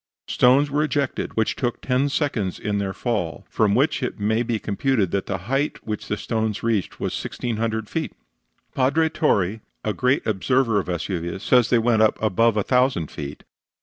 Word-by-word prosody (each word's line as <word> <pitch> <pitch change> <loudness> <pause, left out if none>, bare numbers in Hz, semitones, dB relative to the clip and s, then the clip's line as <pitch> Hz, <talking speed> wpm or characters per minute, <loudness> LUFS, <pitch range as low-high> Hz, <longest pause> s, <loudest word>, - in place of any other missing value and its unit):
Stones 135 +4 +4
were 145 +1 +1
ejected 145 -6 -2
which 110 - +1
took 120 -2 -2
ten 130 +2 +1
seconds 125 - -1
in 105 -1 -1
their 100 -1 -2
fall, 95 -9 -3
from 105 -2 +2
which 145 +4 +2
it 125 - -3
may 110 +3 +1
be 120 -1 -1
computed 105 -2 0
that 100 - -1
the 95 - -1
height 135 +5 -1
which 105 -2 -4
the 105 - -1
stones 110 -1 -2
reached 110 -5 -1
was - - -2
1,600 110 -2 -2
feet. 160 +5 -3 0.6
Padre 150 +5 +2
Torre, 105 - +1 0.2
a 105 - -1
great 130 +4 +1
observer 115 +2 +2
of - - -4
Vesuvius, 85 +1 -3
says 125 -3 +4
they 125 - +4
went 115 -1 +2
up 110 - +3
above 110 +1 +2
a 105 - +2
thousand 125 - +1
feet. 70 0 -7
110 Hz, 180 wpm, -23 LUFS, 100-130 Hz, 0.6 s, Stones